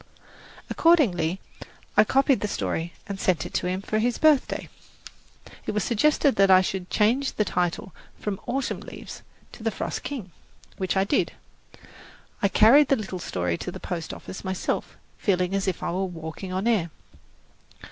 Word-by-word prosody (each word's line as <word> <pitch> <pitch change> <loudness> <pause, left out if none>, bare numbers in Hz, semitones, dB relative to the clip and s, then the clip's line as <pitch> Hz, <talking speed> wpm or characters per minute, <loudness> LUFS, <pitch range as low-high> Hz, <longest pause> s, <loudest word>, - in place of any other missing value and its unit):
Accordingly 200 - +3 0.6
I 210 - +7
copied 270 +3 +3
the 210 - -1
story 170 -3 -2
and 200 -1 -6
sent 185 -4 +1
it - - -8
to - - 0
him 185 +2 -2
for 215 - 0
his 240 +1 +1
birthday. 310 -4 +3 1.0
It - - -1
was 210 -2 0
suggested 280 - +2
that 195 0 +5
I 185 -1 +8
should 185 -1 -3
change 245 +6 +2
the 210 - 0
title 180 +1 -1 0.3
from 205 -2 -3
"Autumn 265 +2 -1
Leaves" - - -9 0.3
to - - -12
"The 225 - +1
Frost 205 - -4
King," 235 -11 -6 0.5
which 190 0 -1
I 190 - +4
did. 200 - +1 1.1
I 200 - +4
carried 245 +9 +6
the 275 - +4
little 195 -6 -5
story 90 - -2
to - - -4
the - - -8
post 170 -3 -4
office 190 - -8
myself, 190 -1 -3 0.2
feeling 185 -2 +1
as 195 0 0
if 185 - -2
I - - -1
were 190 +2 -1
walking 170 +1 -7
on 190 +3 -2
air. 210 -8 +2
195 Hz, 165 wpm, -25 LUFS, 180-235 Hz, 1.1 s, I